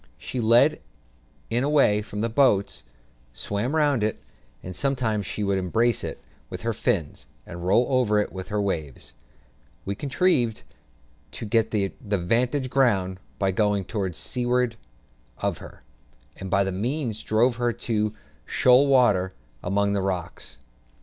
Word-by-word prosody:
She 125 - -5
led 120 +7 +4 0.7
it 120 +2 +1
away 140 -8 +3
from 105 0 -6
the 115 - +1
boats, 110 -5 +2 0.5
swam 105 - -3
round 145 -7 +2
it, 110 - -1 0.4
and 90 0 -7
sometimes 115 -7 -1
she 105 - -3
would 100 -1 +1
embrace 115 +6 +1
it - - -4 0.3
with - - -7
her - - 0
fins, - - -2 0.2
and 85 +1 -8
roll 100 +7 +3
over 125 -5 +2 0.2
with 95 -1 -7
it - - -15
in 105 - -4
the 105 - +1
waves. 80 -11 -4 0.7
We 100 - -2
contrived 130 - +1 0.7
to - - -5
get 115 +1 +2
the 100 -3 -1
"'vantage 120 +7 0
ground" 95 -9 +2 0.2
by 95 -1 +1
going 100 0 +1
to 100 -3 -2
seaward 125 +4 -1 0.6
of - - -2
her, - - -13 0.5
and 95 - -7
by 100 +1 +3
that 95 - -2
means 115 +3 -2
drove 115 +3 +2
her 120 -1 +1
into 110 -2 -1 0.3
shoal 130 +3 +4
water 105 -9 +3 0.3
among 100 +2 0
the 100 - 0
rocks. 90 -3 -4
110 Hz, 150 wpm, -25 LUFS, 100-125 Hz, 0.7 s, led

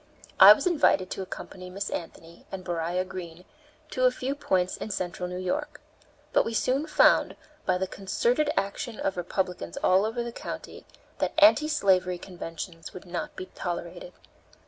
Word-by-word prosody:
I - - +12
was - - -4
invited 290 - +3
to - - -3
accompany 185 0 -8
Miss 195 +2 -4
Anthony 165 0 -8
and 190 -1 -6
Beriah 175 +1 -1
Green 180 -2 -8 0.5
to 255 - +1
a - - +7
few 255 +2 -3
points 185 -10 0
in - - -6
Central 180 -2 -3
New 180 - -5
York. 290 +12 -3 0.5
But - - +5
we 230 - -4
soon 270 +7 +1
found, 305 - +4 0.3
by 185 - +3
the 190 - -1
concerted 235 +10 0
action 205 +3 -2
of 195 - -1
Republicans 180 - -3
all 185 +2 +5
over 225 +2 -2
the 235 - -5
country, - - -8 0.3
that - - 0
anti 305 -1 +6
slavery 185 - +2
conventions 165 -2 -8
would 185 - -9
not 185 +13 -5
be 375 - -6
tolerated. - - -5
190 Hz, 165 wpm, -27 LUFS, 180-255 Hz, 0.5 s, I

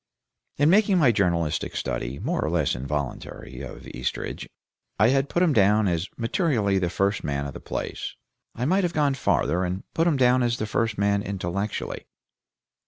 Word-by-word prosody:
In 145 +3 +4
making 200 -1 +4
my 140 -8 +5
journalistic 85 -7 0
study, 60 +3 -3
more - - -1
or - - 0
less - - +1
involuntary, 70 -2 -5
of - - -9
Eastridge, 65 0 -4 0.5
I 110 - +5
had 135 +1 +2
put 175 - +2
him 165 -5 +3
down 105 -1 +4
as 85 +1 0
materially 115 - +1
the 90 -2 0
first 100 +3 0
man 70 -1 -2
of 70 - -5
the - - -8
place; - - -5 0.4
I 125 - -2
might 190 +6 +2
have 175 -1 0
gone 145 -2 +2
farther 90 -8 +1
and 90 +2 -3
put 165 +1 +2
him 155 -5 +2
down 125 0 +4
as 120 -1 +1
the 110 - -2
first 110 0 -1
man 100 0 +2
intellectually. 100 +1 -4
105 Hz, 175 wpm, -25 LUFS, 90-135 Hz, 0.5 s, my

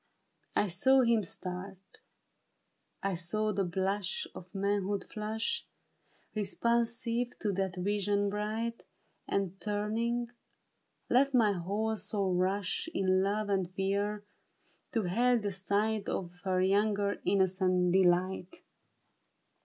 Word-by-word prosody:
I 205 - +3
saw 260 +10 +4
him 230 -3 +3
start; 185 +2 -5 1.3
I 195 0 +1
saw 210 +5 -1
the 195 0 +1
blush 190 +1 -1
Of 180 - -9
manhood 200 0 0
flush 220 +1 -2 0.7
Responsive 235 +3 0
to 210 - -1
that 190 -1 -1
vision 205 +2 +1
bright. 220 +3 -2 0.5
And 195 -1 -1
turning, 225 +3 -1 0.8
let 275 +2 +3
my 220 -4 +5
whole 205 +5 -1
soul 200 -3 -1
rush 190 - 0
In 185 -1 +3
love 205 +2 0
and 190 -3 0
fear, 200 +2 0 0.7
to 225 -3 +1
hail 240 +7 +3
the 205 -3 -2
sight 200 +2 0
Of 175 -2 -3
her 185 -1 +2
young 205 +2 +3 0.3
innocent 185 -2 +2
deHght. 185 0 +2
200 Hz, 110 wpm, -31 LUFS, 190-215 Hz, 1.3 s, my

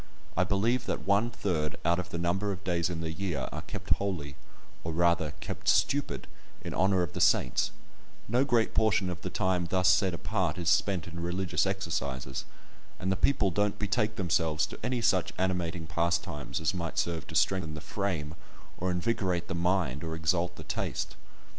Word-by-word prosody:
I 90 - +4
believe 115 +6 +1
that - - -2
one 100 +4 +3
third 85 -10 -1
out 85 +1 +3
of 90 - -4
the - - -4
number 90 +4 0
of 95 0 -6
days 85 -1 +1
in 85 -2 -3
the 80 -1 -2
year 80 -5 -2
are - - -4
"kept - - -7
holy," 85 -9 -3 0.5
or 85 - -2
rather, 85 -2 +2
kept - - -6
stupid, 145 0 +2 0.4
in - - -4
honour 95 0 +3
of 85 - -4
the - - -3
saints; - - +3 0.6
no 120 +5 +3
great 120 -5 +2
portion 105 -4 +3
of 85 - -6
the - - -3
time 90 -2 0
thus 95 +1 +3
set 95 -1 +4
apart 95 -3 -1
is 85 -2 0
spent 95 -5 +2
in 85 -1 -7
religious 90 +2 0
exercises, 70 -9 -2 0.5
and 95 +1 0
the - - +2
people 100 -1 +2
don't 105 +2 +1
betake 105 +1 0
themselves 80 -4 +1
to - - -9
any 125 -1 -1
such 100 -6 +2
animating 90 -3 -1
pastimes 85 -4 -1
as 80 +2 +1
might 85 -3 -4
serve 85 -3 -1
to - - -8
strengthen 90 -5 +2
the - - -5
frame, 80 -3 -2 0.5
or 95 - 0
invigorate 90 -2 0
the - - -3
mind, 85 -5 +1
or 80 -1 -3
exalt 85 +2 +1
the - - -9
taste. - - -3
90 Hz, 185 wpm, -30 LUFS, 85-100 Hz, 0.6 s, I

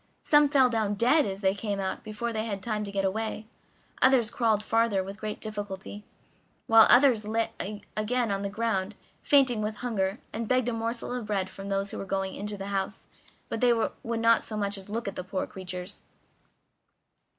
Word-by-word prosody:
Some 295 -1 +5
fell 270 -3 +5
down 220 -4 0
dead 255 +8 +4
as 195 0 -5
they 190 -1 +3
came 200 0 -3
out 190 -1 -3
before 230 +2 -4
they 220 0 -1
had 200 -4 -4
time 215 -2 -2
to 200 - -6
get 195 -1 0
away; 215 +2 -2 0.6
others 255 -4 +4
crawled 220 -4 +1
farther 225 -4 +2
with 195 +2 -8
great 215 -1 -4
difficulty; 205 -1 -6 0.6
while 225 0 +7
others 245 -4 +6
again 225 +2 -1 0.8
lay - - +1
on 195 - -2
the 200 - -2
ground, 205 -2 -1 0.3
fainting 260 -6 +4
with 215 0 -2
hunger, 205 -4 -1 0.2
and 225 0 -3
begged 255 0 +2
a - - -2
morsel 230 +2 -3
of 245 -4 -4
bread 195 -3 -1
from 195 0 -8
those 195 0 -1
who - - -6
were - - -5
going 195 0 -2
into 205 +1 -4
the 195 +1 -6
house, 195 +2 -3 0.4
but 225 - -4
they 245 -1 +5
would 230 0 -2
not 230 0 +4
so 215 - -5
much 200 -1 0
as 195 0 -9
look 225 +1 -3
at 195 - -4
the 185 - -4
poor 185 +1 -3
creatures. 185 0 -7
215 Hz, 195 wpm, -28 LUFS, 195-230 Hz, 0.8 s, while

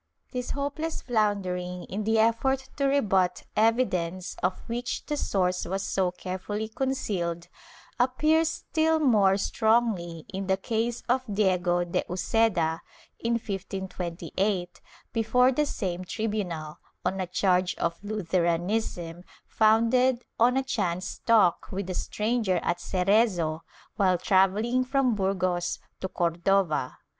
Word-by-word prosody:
^ - - -39
This 250 -1 -4
hopeless 285 +3 -3
floundering 185 -6 -1
in 205 +2 -4
the 220 +1 +2
effort 260 +4 +2
to 280 - +1
rebut 195 -10 +2
evidence 185 -6 +1
of 185 - 0
which 240 +1 -3
the 300 - -2
source 185 -9 0
was 195 +2 -2
so 190 -2 +1
carefully 190 +4 -5
concealed 195 -10 -2 0.5
appears 305 +6 +3
still 320 0 0
more 210 -9 +4
strongly 205 -7 +1
in 190 0 -3
the 190 0 +2
case 225 +4 -2
of 255 +2 +2
Diego 180 -3 +2
de 175 - -1
Uceda, 180 -3 +1 0.4
in 230 0 0
1528, 190 -3 -3 0.3
before 245 +3 +3
the 295 +3 +1
same 185 -8 -3
tribunal, 185 -7 -3 0.3
on 190 - 0
a 185 - -2
charge 180 0 +1
of 170 +3 -3
Lutheranism, 175 -2 -1 0.2
founded 230 +3 +3 0.2
on 245 +3 +4
a 270 - +2
chance 185 -8 -2
talk 220 -7 +4
with 190 0 -3
a - - -2
stranger 210 -1 0
at 175 0 0
Cerezo, 185 -4 +1 0.4
while 185 -4 +3
travelling 205 +8 +2
from 260 -1 +1
Burgos 185 -3 0 0.2
to 190 - -3
Cor 170 -2 0
dova. 170 -6 +1
200 Hz, 125 wpm, -27 LUFS, 180-235 Hz, 0.5 s, more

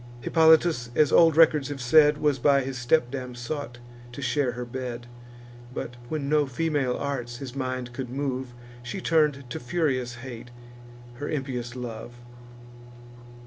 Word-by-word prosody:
Hippolytus, 160 -5 +4
as 150 0 +4
old 165 -2 +6
records 155 -4 +5
have 145 -1 -5
said, 150 +4 +5
Was 150 -3 +1
by 140 +2 +4
his 135 0 -4
stepdam 125 -1 0
sought 120 +1 -5 0.4
to 120 - -8
share 130 0 0
her 125 +1 -5
bed; 120 -1 -6 0.7
But, 120 -1 -6
when 150 -3 -3
no 150 -1 +2
female 140 -2 -1
arts 125 -4 -4
his 130 0 -8
mind 130 -2 -3
could 130 -1 -5
move, 130 -2 -3 0.3
She 120 +10 -5
turn'd 150 -6 +1
to 120 - -5
furious 130 -4 -1
hate 125 -1 -9 0.7
her 145 +3 -5
impious 130 -4 -4
love. 120 -1 -7
130 Hz, 145 wpm, -26 LUFS, 120-150 Hz, 0.7 s, old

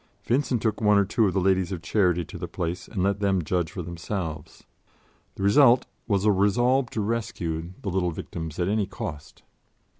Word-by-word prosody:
Vincent 125 0 0
took 110 -1 0
one 105 -1 +5
or 100 - +4
two 110 +2 +2
of 95 - -1
the - - +3
Ladies 95 -1 +2
of 85 -3 -5
Charity 90 -1 +2
to - - -9
the - - -4
place 90 0 -4
and 95 -5 -2
let 100 0 +1
them 95 -3 +1
judge 85 +1 -1
for 90 - -5
themselves. 85 -2 -5 0.7
The 95 - -5
result 120 +4 +5 0.2
was 100 -3 +1
a 105 - +5
resolve 120 +7 +2
to 110 - -3
rescue 90 -6 -3
the 100 - -2
little 90 -1 +1
victims 80 -1 -6
at 90 - 0
any 105 -1 +1
cost. 75 -6 -7
95 Hz, 190 wpm, -26 LUFS, 85-105 Hz, 0.7 s, one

